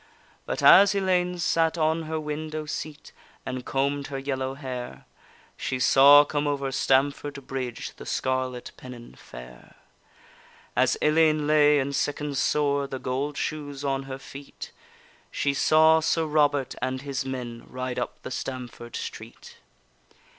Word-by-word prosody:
But - - -3
as 200 +1 +8
Ellayne 180 -2 +1
sat 165 -1 +1
on 160 +1 +1
her 160 0 -2
window 155 0 -5
seat 150 0 -7 0.3
And 130 -1 -4
comb'd 140 +2 -1
her 140 - -5
yellow 135 -1 -3
hair, 130 -3 -7 0.5
She 130 - -3
saw 140 +3 +7
come 145 0 -2
over 140 -2 -1
Stamford 140 +1 0
bridge 130 -3 -5
The - - -10
scarlet 130 -1 -2
pennon 125 -2 -11
fair. - - -13 1.0
As - - +2
Ellayne 155 -1 +3
lay 150 -1 +5
and 140 0 -1
sicken'd 145 0 -2
sore, 140 0 +1
The 135 - -5
gold 135 +3 -3
shoes 145 -2 -4
on 135 -1 0
her 130 - -5
feet, 135 +1 -10 0.6
She 140 - -1
saw 160 +3 +5
Sir 160 0 0
Robert 145 -3 +1
and 130 +1 -3
his 140 -1 -3
men 125 -3 -6
Ride 130 -1 -4
up - - -5
the - - -7
Stamford 125 -3 -6
street. - - -8
140 Hz, 140 wpm, -26 LUFS, 130-150 Hz, 1.0 s, as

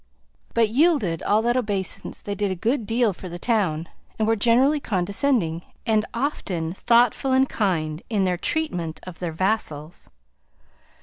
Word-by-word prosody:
But, 230 -2 +4
yielded 240 - +2
all 215 +2 +2
that 240 +1 +2
obeisance, 205 -7 -3
they 205 - -3
did 205 0 -1
a 185 - -2
good 225 +4 -1
deal 225 -2 +2
for 180 +1 -9
the 175 - -6
town, 175 -7 0 0.3
and 220 - +1
were 225 - +3
generally 250 +7 +3
condescending, 195 - 0 0.2
and 220 -2 +2
often 190 - -2
thoughtful 240 +5 +3
and 265 +1 +4
kind 160 -9 -1
in 210 -4 +1
their 180 -1 +1
treatment 175 - -2
of 185 -2 -10
their 175 -2 -3
vassals. 165 -4 -2
205 Hz, 150 wpm, -24 LUFS, 175-240 Hz, 0.3 s, But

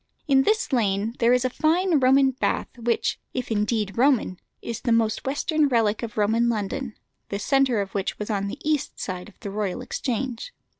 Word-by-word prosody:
In 270 -2 +5
this 430 - +1
lane 210 -2 +1
there 235 0 +4
is 250 0 +3
a - - +2
fine 330 +3 +2
Roman 265 +1 +5
bath 260 - -2
which, 235 -1 -1 0.2
if 250 -2 -3
indeed 210 0 0
Roman, 250 -9 +2 0.2
is 230 -2 -5
the 245 - -1
most 230 +2 +1
western 295 +2 +1
relic 225 -5 +1
of 225 -3 -6
Roman 225 +3 +2
London, 230 +3 -3 0.3
the 200 - -2
centre 260 +1 +2
of 195 -1 -5
which 195 -1 -2
was 210 +1 -4
on 200 -1 -1
the 200 - -5
east 305 -3 0
end 185 +1 -5
of 210 - -23
the 200 - -5
Royal 205 +2 -2
Exchange. 255 - -3
235 Hz, 190 wpm, -24 LUFS, 210-270 Hz, 0.3 s, In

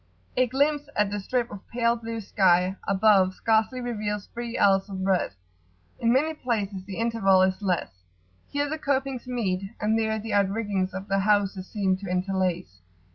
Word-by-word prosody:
A 255 0 +3
glimpse 290 +3 +1
at 210 -1 +1
the 205 - -2
[p.89]strip 240 +4 -1
of 205 -1 -10
pale 235 0 +1
blue 230 -1 -5
sky 185 -2 +3
above 195 -2 +4
scarcely 225 +3 +1
reveals 210 -4 -3
three 235 0 -4
ells 195 0 +3
of 190 -1 -4
breadth: 185 - +1 0.6
in 230 - +2
many 300 +6 +2
places 210 -9 -2
the 195 -1 -7
interval 220 -5 +3
is 190 +2 0
less: 175 - -2 0.5
here 285 0 -1
the 310 +2 -4
copings 270 -3 -1
meet, 210 -7 -1 0.2
and 220 +1 +1
there 220 0 0
the 225 +1 -5
outriggings 200 -2 0
of 190 +1 -6
the 195 0 +1
houses 200 -2 +1
seem 195 -3 0
to 195 +1 -8
interlace. 180 - -1
205 Hz, 170 wpm, -26 LUFS, 190-235 Hz, 0.6 s, above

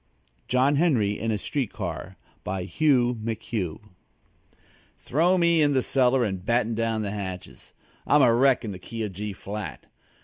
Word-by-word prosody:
JOHN 130 +3 +3
HENRY 120 -11 +2
IN 115 - -2
A 110 - +1
STREET 130 +3 -3
CAR 95 +1 -6 0.3
BY 95 -1 -3
HUGH 125 - +2
McHUGH 110 -5 -3 1.2
Throw 175 +7 +2
me 170 -2 +3
in 145 -1 +3
the 130 -2 +2
cellar 130 -1 +2
and 95 -5 -3
batten 115 +2 +1
down 115 -1 -1
the 100 - -3
hatches. 95 -3 -7 0.4
I'm 150 -1 +5
a 120 -2 +5
wreck 130 0 +3
in 105 - -4
the 95 - -8
key 115 +2 -6
of 105 -3 -4
G 105 +3 -4
flat. 105 +2 -7
115 Hz, 165 wpm, -25 LUFS, 105-135 Hz, 1.2 s, I'm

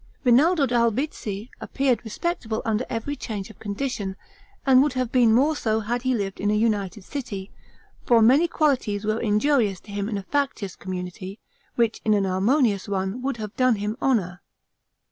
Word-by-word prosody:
Rinaldo 285 +5 +4
d'Albizzi 235 -3 -1
appeared 260 -5 0
respectable 225 - -3
under 225 +2 0
every 250 +5 -3
change 210 -6 -6
of - - -20
condition; 205 -2 -3 0.5
and 260 -1 +6
would 290 -1 +1
have 255 -2 -2
been 245 -3 +4
more 280 +7 +3
so 220 -5 0
had 240 +3 -2
he 260 0 +1
lived 195 -3 -3
in 205 - 0
a 210 - +2
united 210 -2 0
city, 200 -6 -6 0.5
for 235 -2 +4
many 265 +10 +5
qualities 250 -11 0
were 215 +1 0
injurious 215 -2 +2
to 205 - -13
him 200 +1 -3
in 210 - -2
a 200 - -5
factious 260 -6 -2
community, 185 +2 -6 0.4
which 230 -2 +1
in 215 -1 +3
an 200 - +2
harmonious 200 +3 +1
one 195 +4 -2
would 270 -1 -2
have 215 -1 -6
done 255 -2 +3
him 210 +1 -3
honor. 195 -9 0
225 Hz, 170 wpm, -24 LUFS, 205-255 Hz, 0.5 s, and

